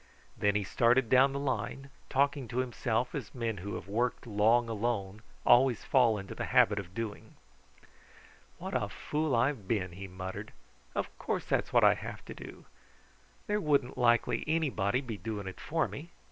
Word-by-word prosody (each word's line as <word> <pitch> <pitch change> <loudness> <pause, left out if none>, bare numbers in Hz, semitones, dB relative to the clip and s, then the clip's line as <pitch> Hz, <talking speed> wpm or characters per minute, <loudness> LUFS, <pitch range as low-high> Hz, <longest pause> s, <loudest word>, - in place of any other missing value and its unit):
Then 100 0 +1
he 105 - +1
started 120 +4 +3
down 130 +2 +6
the 140 - -3
line, 135 +1 -3 0.2
talking 140 -1 +1
to 115 - -6
himself 125 -1 -1
as 135 -5 -6
men 115 -3 -2
who 100 +3 -5
have - - -7
worked 120 +6 -1
long 115 +2 +3
alone 110 -2 -2 0.2
always 125 -1 +5
fall 120 -5 +4
into 100 -1 -7
the - - -4
habit 105 +1 +4
of 95 -1 -9
doing. 115 -3 -5 1.2
"What - - -6
a - - 0
fool 150 -3 -1
I 115 +4 +4
have 115 -10 -7
been!" 95 -5 0
he 95 +3 -8
muttered. 95 +3 -7 0.4
"Of - - -3
course - - -2
that's - - 0
what - - +4
I - - +7
have - - -8
to - - -7
do! - - -11 0.8
There 210 0 0
wouldn't 140 -6 +1
likely 120 -2 +2
anybody 135 -8 +1
be 115 -6 -6
doing 105 -2 -5
it 95 - -7
for 160 0 0
me. 160 +4 -8
115 Hz, 175 wpm, -31 LUFS, 105-135 Hz, 1.2 s, I